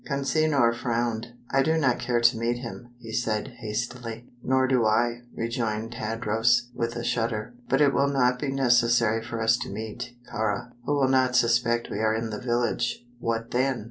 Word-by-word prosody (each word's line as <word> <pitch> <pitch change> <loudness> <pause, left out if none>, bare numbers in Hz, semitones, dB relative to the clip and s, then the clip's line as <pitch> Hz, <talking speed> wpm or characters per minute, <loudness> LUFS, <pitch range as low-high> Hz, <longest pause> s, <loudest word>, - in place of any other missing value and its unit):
Consinor 140 -3 +2
frowned. 115 -1 -1 0.2
"I 135 - +4
do 160 +4 +2
not 135 -6 +2
care 120 -1 0
to 120 +1 +5
meet 120 +1 0
him," 120 0 -8
he 115 -2 -10
said, 115 0 -1
hastily. 115 +1 -4 0.2
"Nor 130 0 +2
do 125 -2 +3
I," 120 +2 +2
rejoined 115 -1 -2
Tadros, 115 +1 +1
with 115 -1 -2
a 120 - -4
shudder; 115 0 -1 0.2
"but 135 +2 +3
it 140 -2 +5
will 140 - +3
not 125 -2 +2
be 145 - -2
necessary 120 -4 +3
for 115 0 -5
us 115 +1 +3
to - - -5
meet 110 +3 -6 0.2
Kāra, 110 +1 -1 0.2
who 145 - +2
will 135 -2 +3
not 130 -1 +3
suspect 120 -1 +2
we 100 - -3
are 110 0 +2
in 110 0 -3
the 105 - -4
village." 120 0 -1
"What 115 0 -2
then?" 130 0 +1
120 Hz, 180 wpm, -26 LUFS, 115-125 Hz, 0.2 s, to